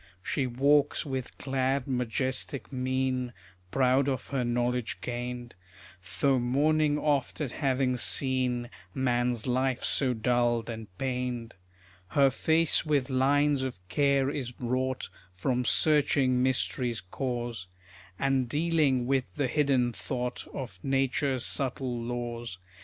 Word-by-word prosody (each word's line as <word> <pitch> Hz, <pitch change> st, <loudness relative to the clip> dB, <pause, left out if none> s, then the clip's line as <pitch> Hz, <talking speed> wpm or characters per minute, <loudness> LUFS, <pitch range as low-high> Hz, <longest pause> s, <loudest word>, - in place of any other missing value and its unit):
She 135 Hz, +3 st, 0 dB
walks 140 Hz, +5 st, +2 dB
with 130 Hz, -3 st, -4 dB
glad 135 Hz, 0 st, -1 dB
majestic 130 Hz, +1 st, -2 dB
mien, 130 Hz, -1 st, -1 dB, 0.4 s
Proud 130 Hz, +3 st, +3 dB
of 130 Hz, -, -3 dB
her 135 Hz, -3 st, 0 dB
knowledge 120 Hz, 0 st, -1 dB
gained; 120 Hz, 0 st, -5 dB, 0.7 s
Though 135 Hz, -2 st, +3 dB
mourning 145 Hz, +4 st, +2 dB
oft 145 Hz, -3 st, 0 dB
at 145 Hz, -5 st, -2 dB
having 130 Hz, -3 st, 0 dB
seen 125 Hz, -1 st, +2 dB, 0.2 s
Man's 120 Hz, -2 st, +1 dB
life 130 Hz, 0 st, 0 dB
so 130 Hz, -3 st, +2 dB
dulled 120 Hz, 0 st, +1 dB
and 110 Hz, -1 st, -7 dB
pained. 125 Hz, -2 st, -3 dB, 0.5 s
Her 135 Hz, +5 st, +4 dB
face 160 Hz, +4 st, +2 dB
with 145 Hz, -4 st, 0 dB
lines 140 Hz, +2 st, +3 dB
of 130 Hz, -6 st, -3 dB
care 140 Hz, 0 st, +2 dB
is 125 Hz, -4 st, -5 dB
wrought, 130 Hz, +1 st, -1 dB, 0.3 s
From 125 Hz, +7 st, 0 dB
searching 140 Hz, -3 st, +3 dB
mystery's 125 Hz, -3 st, 0 dB
cause, 120 Hz, 0 st, -4 dB, 0.5 s
And 135 Hz, -1 st, +1 dB
dealing 150 Hz, -4 st, +2 dB
with 130 Hz, 0 st, -1 dB
the 145 Hz, -, 0 dB
hidden 130 Hz, -3 st, +2 dB
thought 125 Hz, +5 st, -4 dB
Of 100 Hz, -9 st, -6 dB
nature's 135 Hz, -1 st, +1 dB
subtle 130 Hz, -3 st, -1 dB
laws. 120 Hz, -3 st, -4 dB
130 Hz, 120 wpm, -29 LUFS, 120-135 Hz, 0.7 s, Her